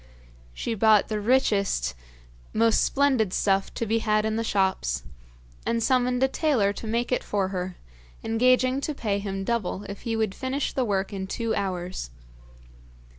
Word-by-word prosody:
She 230 - -2
bought 215 -1 +4
the 215 -1 -2
richest, 205 - +2 0.6
most 225 0 +3
splendid 265 -9 +2
stuff 195 -1 +1
to 230 - -1
be 225 +1 +1
had 215 -1 +1
in 220 0 0
the 225 - 0
shops, 190 - 0 0.6
and 230 -1 0
summoned 250 0 +2
a - - +5
tailor 260 -9 +1
to 220 - -7
make 235 +3 -1
it 250 - +1
for 195 -2 -1
her, 185 -1 -4 0.5
engaging 255 +3 +3
to 300 +1 -3
pay 205 -6 -1
him 195 -1 -4
double 210 -3 -2
if 200 -1 -8
he 230 -2 -2
would 220 -3 0
finish 265 +5 -2
the 260 - 0
work 200 -1 -1
in 190 -1 -4
two 230 +2 -2
hours. 185 - -3
220 Hz, 165 wpm, -26 LUFS, 195-245 Hz, 0.6 s, a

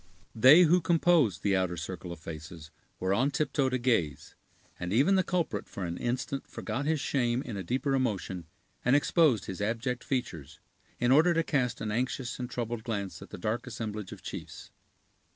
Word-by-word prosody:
They 130 +10 +8
who 175 +2 +4
composed 165 - +3
the 100 -1 +2
outer 90 -2 0
circle 90 +2 -6
of 85 - -8
faces 80 0 -9 0.3
were 95 +1 +1
on 130 +8 +2
tiptoe 145 -2 0
to 130 - 0
gaze; 85 - 0 0.5
and 90 +1 -4
even 135 - +4
the 190 - +4
culprit 170 - -2
for 95 - -5
an 85 0 -4
instant 130 +3 -2
forgot 125 +7 -4
his 160 -1 +1
shame 125 -2 0
in 115 - -6
a 100 - -3
deeper 130 - -1
emotion, 95 -9 -1 0.4
and 125 +3 +4
exposed 145 - +3
his 95 +1 -6
abject 120 +4 -2
features, 85 - -4 0.4
in 120 0 +2
order 165 +5 +5
to 165 - +2
cast 130 -6 0
an 110 - -2
anxious 125 +2 -2
and 125 -1 -4
troubled 120 -2 -4
glance 100 -5 -4
at - - -10
the - - -8
dark 110 +7 -2
assemblage 110 -4 -5
of - - -10
chiefs. - - -8
120 Hz, 185 wpm, -29 LUFS, 95-135 Hz, 0.5 s, They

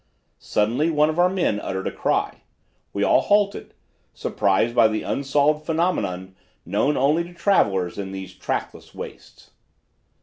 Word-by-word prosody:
Suddenly 120 +10 0
one 150 -1 +3
of 160 - -4
our 180 +1 +5
men 180 - 0
uttered 95 -2 -4
a - - -1
cry. - - -1 0.5
We - - -1
all - - +4
halted, 205 -1 +1 0.4
surprised 100 +4 +1
by 120 -2 +5
an 110 0 -2
unsolved 145 +2 +1
phenomenon 155 - -1 0.3
known 105 - +1
only 150 +6 +2
to 175 +1 -12
travelers 100 - +1
in 95 -1 -5
these 95 -1 -7
trackless 95 - -5
wastes. - - -11
140 Hz, 140 wpm, -23 LUFS, -, 0.5 s, our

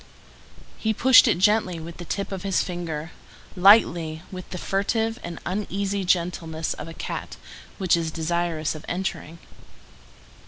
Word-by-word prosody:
He 220 -1 0
pushed 260 +3 +7
it 220 - +3
gently 190 -3 +2
with 165 +1 -9
the 175 - -8
tip 200 +3 -3
of 190 -2 -4
his 195 -1 +1
finger, 165 -3 -5 0.4
lightly, 175 -5 +4
with 185 -1 -8
the 185 - -6
furtive 220 +5 -1
and 170 -1 -6
uneasy 200 +1 -2
gentleness 170 -3 -1
of 150 - -8
a 165 - -8
cat - - -6 0.4
which 185 -4 +3
is 165 -1 -1
desirous 165 -1 -1
of 155 -1 -9
entering. 175 -3 -4
180 Hz, 145 wpm, -24 LUFS, 165-200 Hz, 0.4 s, pushed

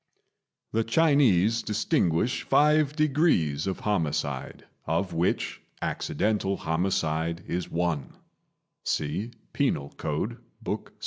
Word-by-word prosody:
The 115 +1 +1
Chinese 115 - +4
distinguish 105 - +1
five 150 0 +3
degrees 135 - +2
of 95 - -2
homicide, 75 -8 -2 0.2
of 85 +4 0
which 85 +2 0 0.2
accidental 105 -2 -1
homicide 80 -1 -1
is 90 0 -3
one 85 -5 -1 0.7
(see 80 +10 -1 0.2
Penal 70 - 0
Code, 90 +10 -2 0.2
Book - - -3
VI.) - - -31
95 Hz, 100 wpm, -27 LUFS, 80-115 Hz, 0.7 s, Chinese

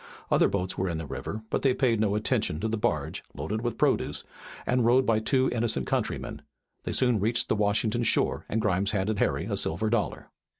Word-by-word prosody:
Other - - +5
boats 95 -2 -2
were 95 0 0
in 85 - -2
the 80 - -5
river, 105 +9 -5
but - - 0
they 130 -2 +3
paid 120 -4 +2
no 105 -1 +1
attention 105 -7 0
to 110 - 0
the 110 - -1
barge, 105 - -1
loaded 100 +10 -3
with 120 -1 -2
produce, - - +1 0.4
and 125 -1 +2
rowed 125 +3 +4
by 110 -1 +3
two 130 +4 +2
innocent 120 -1 -1
countrymen. - - -2 0.4
They - - -2
soon 125 -4 +3
reached 115 +4 +1
the - - +3
Washington 105 +2 +1
shore, 115 - +1
and 110 - 0
Grimes 100 -1 +1
handed 105 0 -1
Harry - - +1
a - - -2
silver 110 +7 -1
dollar. 120 - -1
110 Hz, 205 wpm, -27 LUFS, 100-120 Hz, 0.4 s, Other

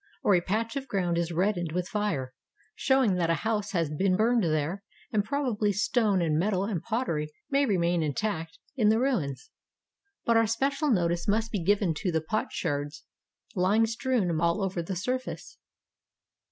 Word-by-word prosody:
Or 205 - +4
a 180 - +4
patch 225 +6 -2
of 275 -1 -4
groimd 180 -7 0
is 170 0 -1
reddened 175 -2 0
with 180 0 -1
fire, 200 -12 -2 0.4
show 265 0 +2
ing 195 -6 +2
that 170 -2 +1
a 165 - +3
house 210 -2 0
has 165 -5 0
been 185 +5 +1
burned 230 +1 +3
there, 160 +3 0 0.3
and 210 -2 +2
probably 220 -4 0
stone 205 -2 +2
and 155 -2 +1
metal 190 +1 +1
and 200 -6 -2
pottery 170 -11 -2 0.2
may 280 0 +3
remain 175 -4 +1
intact 165 +1 -2 0.2
in 220 -6 +3
the 220 - +4
ruins. 175 - -1 0.7
But 230 -1 +4
our 225 -1 +4
special 275 +6 0
notice 175 -6 +1
must 220 +2 +1
be 200 -6 -2
given 195 -2 +2
to 180 - -1
the 160 - +1
pot 185 +8 -2
sherds 145 -2 -3 0.5
lying 200 +5 +3
strewn 225 -8 0
all 170 +4 +1
over 185 -2 -1
the 185 +3 -4
surface. 255 - -4
195 Hz, 175 wpm, -28 LUFS, 170-225 Hz, 0.7 s, Or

